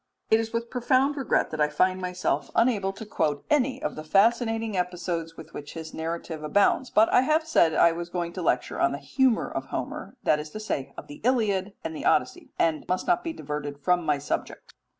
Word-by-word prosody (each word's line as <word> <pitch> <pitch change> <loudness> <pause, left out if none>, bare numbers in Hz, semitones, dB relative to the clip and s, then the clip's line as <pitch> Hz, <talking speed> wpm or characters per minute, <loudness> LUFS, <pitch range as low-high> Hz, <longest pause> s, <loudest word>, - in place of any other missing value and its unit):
It 220 - +6
is 225 0 -3
with 230 0 -3
profound 260 +3 +2
regret 270 -5 0
that 155 - -3
I 150 - +3
find 185 +5 +1
myself 180 -6 -1
unable 215 -5 +2
to 195 +3 -9
quote 150 -8 -1
any 270 -3 +2
of - - -2
the 155 - -6
fascinating 225 +4 +2
episodes 175 -2 -3
with 160 - -11
which 145 +2 -8
his 160 -1 -7
narrative 165 0 -4
abounds, 205 - +2
but 220 +1 +5
I - - +7
have 310 +4 +2
said 170 - +3
I 170 - +6
was 170 +1 -5
going 170 -1 -3
to 185 - -5
lecture - - 0
on - - +3
the - - -3
humour 260 -4 +1
of - - -4
Homer - - -5
that 150 - +3
is 150 0 -6
to 215 - -5
say 145 -11 -3
of - - -7
the 145 - -12
Iliad 210 -6 +1
and 160 0 -4
the - - -6
Odyssey - - +1
and 160 -2 +1
must 185 0 0
not 355 0 +2
be 330 - -2
diverted 150 - -5
from 175 +5 +1
my 150 -2 +1
subject. 140 - -5
185 Hz, 215 wpm, -26 LUFS, 160-230 Hz, -, I